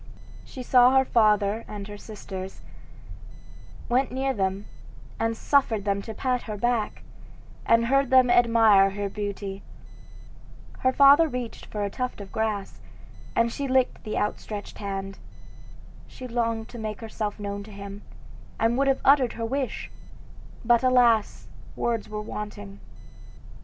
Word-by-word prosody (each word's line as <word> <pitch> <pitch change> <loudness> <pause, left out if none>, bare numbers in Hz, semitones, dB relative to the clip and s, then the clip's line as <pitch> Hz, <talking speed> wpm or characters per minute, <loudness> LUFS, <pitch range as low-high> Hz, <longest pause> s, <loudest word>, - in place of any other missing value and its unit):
She 255 - -9
saw 250 +1 +5
her 265 - +4
father 215 -2 +2
and 205 -1 -7
her 205 - -8
sisters, 195 -3 -8 1.2
went 255 +1 +1
near 265 +1 -1
them, 195 -2 -2 0.5
and 225 0 -1
suffered 225 -8 +1
them 200 -1 0
to 220 +1 -8
pat 250 +1 -1
her 210 - -4
back, 235 0 -1 0.6
and 230 0 +4
heard 275 +2 +2
them 255 -2 +5
admire 225 -5 +5
her 200 +1 -4
beauty. 200 -1 -5 1.2
Her 260 - +2
father 280 +4 +6
reached 250 -4 -6
her 210 -1 -3
a 200 - -2
tuft 250 0 -4
of 200 -1 -9
grass, 220 -3 -3 0.5
and 230 0 +2
she 280 +3 -3
licked 260 -1 +1
the 215 - -4
outstretched 210 0 -4
hand. 195 -1 -5 0.9
She 255 - -9
longed 230 -2 -1
to 240 - -9
make 215 -1 -5
herself 215 -2 -4
known 200 0 -4
to 215 - -12
him, 200 0 -9 0.6
and 230 +3 +2
would 275 - +2
have 270 - +1
uttered 270 -3 +5
her 230 - -4
wish; 265 +2 -3 0.7
but, 235 0 +4
alas! 245 -4 +3 0.3
words 230 -3 -2
were 210 0 -5
wanting. 155 - -7
225 Hz, 140 wpm, -25 LUFS, 205-250 Hz, 1.2 s, father